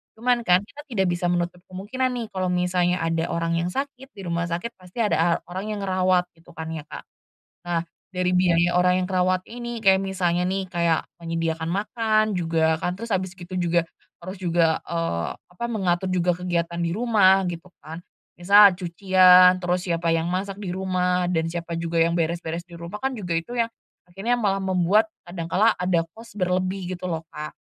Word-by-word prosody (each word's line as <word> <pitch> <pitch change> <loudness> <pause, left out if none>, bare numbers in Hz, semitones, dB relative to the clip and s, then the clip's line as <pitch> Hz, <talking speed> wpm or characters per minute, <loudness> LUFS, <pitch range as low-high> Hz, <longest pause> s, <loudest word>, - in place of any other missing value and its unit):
cuman 240 +1 +1
kan 180 +2 +5
kita 270 +7 -12
tidak 195 -7 0
bisa 175 0 -1
menutup 175 0 -1
kemungkinan 225 +8 -2
nih 230 -2 -4
kalau 185 -1 -2
misalnya 180 0 +1
ada 165 0 0
orang 165 0 -1
yang 170 - -1
sakit 270 +1 -5
di 195 - -11
rumah 170 0 -1
sakit 175 +8 -3
pasti 185 +3 -17
ada 210 - +1
a 165 +2 +3 0.2
orang 195 +4 -4
yang - - -5
ngerawat 185 -1 +2
gitu 165 - -18
kan 160 0 -6
ya 155 -2 -5
Kak, - - -8 0.6
nah 170 -1 0 0.3
dari 180 -1 -1
biaya 175 -1 +3
orang 180 0 +4
yang - - -3
kerawat 185 0 +1
ini 240 0 -6
kayak 190 0 +5
misalnya 180 -2 0
nih 190 0 -1
kayak 170 -2 +1 0.2
menyediakan 165 -1 -2
makan 215 +2 +1
juga 165 -2 +1
kan 180 +1 -2
terus 230 -1 -4
habis 185 0 -1
gitu 180 +1 -10
juga 170 -1 +1 0.4
harus 185 +1 -6
juga, 170 -2 +2
eee, 165 - -1
apa 180 +7 -8
mengatur 185 -3 0
juga 180 -1 +2
kegiatan 170 -1 -2
di 170 - 0
rumah 195 -5 +4
gitu 170 +1 -8
kan, 160 +3 -8 0.4
misal 200 +2 +7
cucian 185 0 +5
terus 180 +1 -1
siapa 170 -1 0
yang 165 0 0
masak 195 +2 -3
di 190 -4 -5
rumah 180 -1 0
dan 165 -2 0
siapa 170 -1 -4
juga 165 0 -2
yang 170 +1 +2
beres-beres 170 0 -2
di 175 - -17
rumah 170 +5 -6
kan 265 0 -1
juga 180 -7 -2
itu 165 +9 -5
yang, 230 -1 +1 0.4
akhirnya 195 +7 -1
malah 195 -2 +1
membuat 190 +3 +3 0.2
kadang 175 -1 -6
kala 215 +7 +2
ada 180 -2 +1 0.2
cost 230 -2 -12
berlebih 185 0 -1
gitu 180 - -8
loh 165 -3 -2
Kak, 150 - -7
180 Hz, 190 wpm, -24 LUFS, 170-195 Hz, 0.6 s, misal